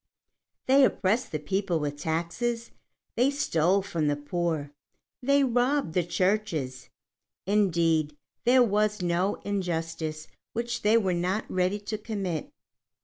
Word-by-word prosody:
They 270 +1 +6
oppressed 225 0 +1
the 155 - -1
people 190 +2 -1
with 145 -1 -2
taxes, 175 +10 -2 0.4
they 250 +4 +3
stole 190 - +1
from 170 -6 -1
the 145 - +2
poor, 150 0 -2 0.5
they 280 +2 +3
robbed 250 - +1
the 180 - +2
churches; 170 -8 -1 0.6
indeed 165 -7 +2 0.3
there 250 +1 +6
was 210 -2 +1
no 175 +3 +1
injustice 165 -5 -3 0.3
which 235 +1 -2
they 215 +2 +4
were 190 -5 +1
not 180 +5 -1
ready 185 +3 +1
to 210 +1 -4
commit. 195 -8 -3
185 Hz, 125 wpm, -27 LUFS, 165-220 Hz, 0.6 s, They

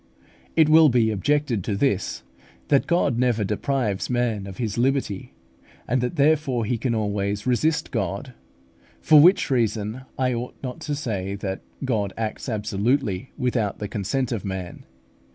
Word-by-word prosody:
It 160 -2 +5
will 155 0 +7
be 115 -3 +3
objected 125 0 0
to 105 - -1
this, 100 - 0 0.5
that 140 -2 +3
God 145 -8 +2
never 120 -4 +2
deprives 105 0 -1
man 120 -5 0
of 95 - -9
his 110 -5 -2
liberty, 125 -5 -1 0.5
and 125 +2 +1
that 125 +7 -2
therefore 140 -5 +2
he 115 +1 -1
can 115 0 0
always 105 -1 -1
resist 150 +5 +1
God; 130 -3 -3 0.7
for 155 - +6
which 180 -2 +5
reason 110 -1 0 0.2
I 130 -1 +1
ought 120 +1 -4
not 125 -2 -5
to 145 - +1
say 100 -9 -3
that 95 -1 -4 0.2
God 105 -6 -1
acts 115 +3 -3
absolutely, 110 +1 -1
without 120 -5 0
the 105 - -4
consent 110 +6 -2
of 115 -5 -2
man. 95 -3 -6
120 Hz, 150 wpm, -24 LUFS, 105-135 Hz, 0.7 s, will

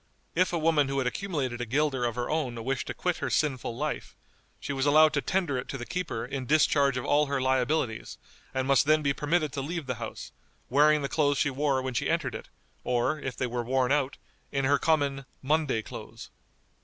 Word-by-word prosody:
If 185 +2 +2
a 175 - 0
woman 155 -3 +3
who 135 0 -2
had 135 - +1
accumulated 130 -5 -2
a - - -1
guilder 135 0 +1
of 120 -1 -1
her 125 0 -2
own 125 -7 -2
wished 135 +1 -2
to - - -3
quit 180 -1 -1
her - - -2
sinful 130 -6 -1
life, 150 +2 -3 0.4
she 140 - -4
was 135 +1 0
allowed 155 +1 +6
to 145 - +1
tender 170 -8 0
it - - -6
to 135 - -5
the 120 - -6
keeper 160 -11 -3
in 130 0 -5
discharge 140 -2 +3
of 125 - -3
all 150 0 +3
her 140 -1 -1
liabilities, 130 -2 0 0.3
and 130 0 -1
must 140 0 +4
then 155 0 +4
be 140 -1 +2
permitted 155 +1 0
to 140 - -2
leave 165 +2 -4
the 125 - -2
house, - - -6 0.4
wearing 150 +2 +5
the - - 0
clothes 145 -1 +1
she 145 - +1
wore 135 -1 0
when 130 -1 -3
she - - -1
entered - - 0
it, - - -8 0.3
or, 125 +5 0
if 130 -3 -5
they 130 - 0
were 120 0 -2
worn 130 +1 +1
out, 140 -1 +1 0.3
in 135 -1 0
her 140 +1 +3
common 140 -4 +1 0.2
"Monday 145 -5 +1
clothes." - - -9
140 Hz, 215 wpm, -28 LUFS, 130-150 Hz, 0.4 s, allowed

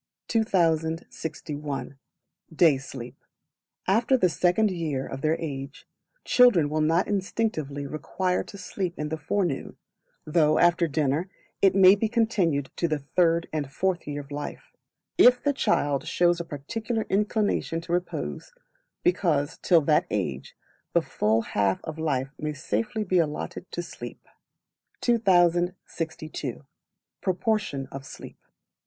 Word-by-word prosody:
2061. 160 - -1 0.5
Day 160 -3 +4
Sleep. 130 -1 -9 0.6
After 230 +7 +3
the 185 -7 +3
Second 185 +5 +2
Year 155 -7 -2
of 135 - -6
their 155 +2 +1
age, 140 -3 -6 0.4
children 190 -13 +5
will 155 0 +1
not 165 +4 +2
instinctively 185 -8 -2
require 180 +5 -2
to 200 - -10
sleep 185 -2 -4
in 150 0 -3
the 160 - -3
forenoon, 160 -1 -2 0.5
though 155 -1 +3
after 175 0 +4
dinner 155 +3 0 0.3
it 195 -1 +5
may 190 -1 +8
be 215 +2 0
continued 195 - +1
to 170 - +1
the 155 -2 0
third 165 +3 +1
and 145 -3 -2
fourth 180 +2 -1
year 145 0 -3
of 140 0 -16
life, 145 +1 -6 0.5
if 250 0 +7
the 285 - +2
child 145 - +1
shows 175 -1 +2
a - - -2
particular 215 - -3
inclination 205 -4 0
to 170 +1 -5
repose; 180 - -3 0.5
because, 165 - +1
till 170 -3 +4
that 150 +1 +2
age, 75 -11 -3 0.4
the - - +3
full 110 +2 +1
half 100 -3 0
of 160 0 -6
life 135 -4 0
may 150 0 -2
safely 135 - -2
be 185 -2 +2
allotted 160 +3 -3
to 175 - -3
sleep. - - -9 0.7
2062. 175 - 0 0.6
Proportion 190 -6 -1
of 135 0 -7
Sleep. - - -11
165 Hz, 130 wpm, -26 LUFS, 145-190 Hz, 0.7 s, may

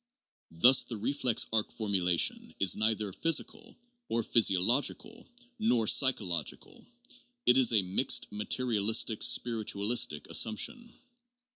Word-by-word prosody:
Thus 125 +11 +4
the 115 - -7
reflex 125 +1 -1
arc 110 -1 -2
formulation 95 -6 -2
is 95 -3 +3
neither 110 -2 -2
physical 165 - -2 0.3
(or 115 0 -2
ph}'si 105 -4 +2
ological) 120 +10 -1 0.3
nor 125 - 0
psychological; 100 - -1 0.6
it 125 - +3
is 130 -3 +4
a 105 -4 +1
mixed 90 +1 0
materialistic 110 0 -1
spiritu 115 -4 +1
alistic 105 -9 0
assumption. 235 - -1
110 Hz, 110 wpm, -28 LUFS, 100-125 Hz, 0.6 s, Thus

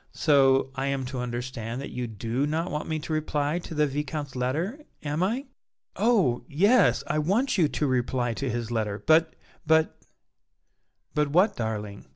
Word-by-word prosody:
So 135 -3 +4
I 135 0 -2
am 135 -1 -1
to 130 0 -5
understand 120 -1 -4
that 140 - -6
you 125 -1 -3
do 115 +6 -2
not 165 +4 -1
want 150 +2 -3
me 155 - 0
to 155 +1 -5
reply 155 +1 0
to 165 - -8
the 150 0 +3
Viscount's 145 0 -4
letter, 155 - -1 0.2
am 150 +2 -2
I?" 235 +9 0 0.5
"Oh! 200 - +2
yes, 200 - +4
I 155 - 0
want 220 - +1
you 160 - +5
to 150 - -1
reply 125 -2 0
to 135 +3 -3
his 120 -1 -3
letter, 105 -3 -2
but 160 +1 +4 0.3
but 160 0 +2 0.5
" - - -50
"But 150 0 +2
what, 180 +9 +3
darling?" 105 -3 -4
145 Hz, 175 wpm, -26 LUFS, 125-160 Hz, 0.5 s, you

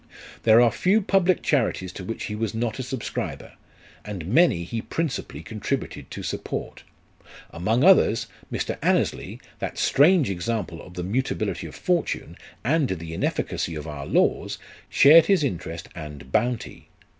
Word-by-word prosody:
There 110 0 +6
are 120 -2 +5
few 195 +4 +2
public 185 -2 +2
charities 110 - 0
to 95 - -7
which 115 +5 -5
he 105 - -4
was 110 0 -2
not 115 +1 -2
a - - 0
subscriber, 130 -1 -5 0.5
and 100 -6 -6
many 115 - +3
he 110 +6 -4
principally 160 +2 -4
contributed - - -4
to - - -7
support. - - -5 0.7
Among 110 +9 0
others, 180 - +5 0.3
Mr. - - -3
Annesley, - - 0 0.2
that - - -4
strange 145 - +4
example 90 -1 -3
of 90 - -13
the 90 - -4
mutability 120 +9 -2
of - - -11
fortune, 175 -3 -1 0.3
and 150 +3 +2
the 85 -5 -5
inefficacy 85 0 -2
of 75 - -6
our 70 -2 -6
laws, - - +1 0.3
shared 155 +3 +7
his 195 -6 +3
interest 85 - -4
and 75 -6 -9
bounty. 120 - -1
115 Hz, 145 wpm, -24 LUFS, 90-145 Hz, 0.7 s, shared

